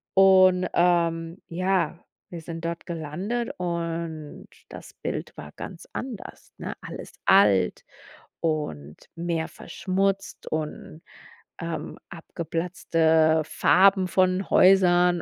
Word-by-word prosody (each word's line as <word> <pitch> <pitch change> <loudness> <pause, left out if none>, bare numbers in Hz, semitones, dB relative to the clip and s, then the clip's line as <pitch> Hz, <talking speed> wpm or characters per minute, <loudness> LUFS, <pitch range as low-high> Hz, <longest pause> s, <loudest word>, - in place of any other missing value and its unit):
und, 185 -1 +6
ähm, 170 0 +1
ja, 180 -2 0 0.3
wir 170 -2 -7
sind 165 0 -7
dort 170 0 -4
gelandet 180 +9 -3
und 165 -3 -4 0.2
das - - -11
Bild - - -5
war 75 - -9
ganz 180 -3 -9
anders, 245 -6 -8
ne? - - -5
Alles - - -9
alt 95 -3 +4 0.6
und 80 - -3 0.2
mehr 170 -1 -2
verschmutzt 195 +1 -2
und, 155 0 -5 0.6
ähm, 170 0 -5
abgeplatzte 165 -1 +1
Farben 190 +4 +4
von 185 +1 +1
Häusern 180 -2 +5
170 Hz, 100 wpm, -25 LUFS, 160-185 Hz, 0.6 s, und